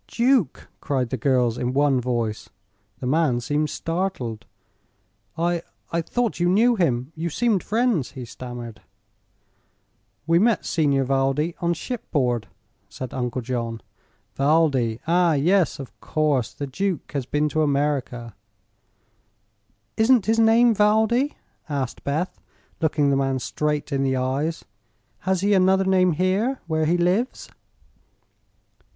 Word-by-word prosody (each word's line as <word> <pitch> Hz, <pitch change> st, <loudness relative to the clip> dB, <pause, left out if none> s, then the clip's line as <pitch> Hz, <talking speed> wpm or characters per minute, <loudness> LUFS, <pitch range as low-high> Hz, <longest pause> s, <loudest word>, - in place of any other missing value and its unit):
"Duke!" 240 Hz, -, +1 dB
cried 130 Hz, -5 st, -2 dB
the -, -, 0 dB
girls, 125 Hz, -2 st, +1 dB
in 125 Hz, +1 st, -1 dB
one 140 Hz, -2 st, +2 dB
voice. 115 Hz, -3 st, -2 dB, 0.5 s
The 125 Hz, -, -7 dB
man 135 Hz, -2 st, +2 dB
seemed 150 Hz, +5 st, -1 dB
startled. 165 Hz, -, -3 dB, 0.9 s
"I 170 Hz, 0 st, 0 dB, 0.3 s
I 170 Hz, -, 0 dB
thought 235 Hz, +5 st, -2 dB
you 175 Hz, 0 st, +2 dB
knew 230 Hz, +6 st, +4 dB
him; 130 Hz, -, 0 dB
you 165 Hz, +2 st, -3 dB
seemed 215 Hz, +2 st, +1 dB
friends," 220 Hz, -, 0 dB
he 130 Hz, -3 st, -7 dB
stammered. 120 Hz, -1 st, -8 dB, 1.4 s
"We 165 Hz, +1 st, +3 dB
met 225 Hz, +3 st, +2 dB
Signor 140 Hz, -4 st, +1 dB
Valdi 135 Hz, +5 st, 0 dB
on 170 Hz, 0 st, 0 dB
shipboard," 135 Hz, -, -2 dB, 0.4 s
said 130 Hz, -2 st, -7 dB
Uncle 125 Hz, 0 st, -3 dB
John. 115 Hz, -2 st, -3 dB, 0.5 s
"Valdi? 135 Hz, -5 st, +2 dB
Ah, 170 Hz, 0 st, +3 dB
yes; 170 Hz, +4 st, +2 dB
of 135 Hz, -2 st, -9 dB
course; 145 Hz, -7 st, 0 dB
the 145 Hz, -, -5 dB
duke 180 Hz, +4 st, -3 dB
has 140 Hz, -4 st, -3 dB
been 150 Hz, +2 st, +1 dB
to 155 Hz, -, 0 dB
America." 140 Hz, -6 st, -1 dB, 1.6 s
"Isn't 225 Hz, -1 st, +4 dB
his 225 Hz, +1 st, +2 dB
name 230 Hz, +1 st, +5 dB
Valdi?" 220 Hz, +6 st, +2 dB, 0.3 s
asked 135 Hz, -4 st, -3 dB
Beth, 155 Hz, +6 st, -2 dB, 0.4 s
looking 145 Hz, -3 st, +2 dB
the -, -, +3 dB
man 135 Hz, -1 st, 0 dB
straight 150 Hz, +3 st, -2 dB
in 135 Hz, -1 st, 0 dB
the 135 Hz, -1 st, +1 dB
eyes. 135 Hz, +6 st, -2 dB, 0.6 s
"Has 190 Hz, -2 st, +1 dB
he 205 Hz, +1 st, +2 dB
another 190 Hz, 0 st, +4 dB
name 185 Hz, -2 st, +3 dB
here, 195 Hz, -, 0 dB
where 160 Hz, -2 st, 0 dB
he 175 Hz, +2 st, +2 dB
lives?" 185 Hz, +9 st, 0 dB
150 Hz, 130 wpm, -23 LUFS, 130-185 Hz, 1.6 s, name